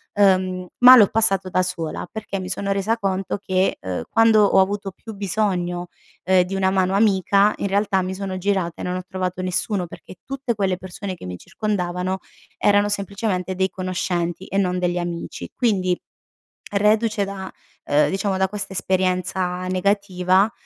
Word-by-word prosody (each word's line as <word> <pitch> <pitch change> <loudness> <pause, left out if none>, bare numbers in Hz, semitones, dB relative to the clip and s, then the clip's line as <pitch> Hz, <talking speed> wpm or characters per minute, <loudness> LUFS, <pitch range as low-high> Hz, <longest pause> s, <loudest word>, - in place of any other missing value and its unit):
uhm, 185 -2 +2
ma 250 +1 +10
l'ho 215 -5 +7
passato 195 -4 +2
da 185 0 +2
sola 165 -3 -4
perché 210 -3 -5
mi 185 - -5
sono 200 +1 -2
resa 200 +4 0
conto 195 -2 -1
che, 185 -1 0
uhm, 90 -3 -3
quando 225 -1 +5
ho 195 - +4
avuto 195 +1 0
più 220 +4 -11
bisogno, 180 -3 -1 0.4
uhm, 185 0 +5
di 180 +2 -6
una 190 -1 +2
mano 190 -1 +1
amica, 200 0 +3
in - - -3
realtà 200 0 +1
mi 185 +1 -3
sono 190 -1 -4
girata 185 -3 -1
e - - -5
non 180 0 -2
ho 185 - -5
trovato 185 -1 -3
nessuno, 185 +1 -1
perché 180 - -12
tutte 270 -2 -3
quelle 190 -3 0
persone 185 +1 -6
che 170 - -11
mi 90 0 -5
circondavano, 185 -3 -2 0.4
erano 205 0 +3
semplicemente 200 -2 -2
dei 190 +1 +1
conoscenti 180 -1 -2
e 195 - -3
non 180 -2 +1
degli 180 0 0
amici 175 -1 -5
quindi, 185 -7 +1 0.7
reduce 210 +1 +2
da, 195 -1 -6 0.4
uhm, 145 +1 +3
diciamo 195 0 -1
da 190 0 +1
questa 200 -1 -4
esperienza 185 -1 -1
negativa, 185 +1 +2
190 Hz, 165 wpm, -22 LUFS, 185-200 Hz, 0.7 s, ma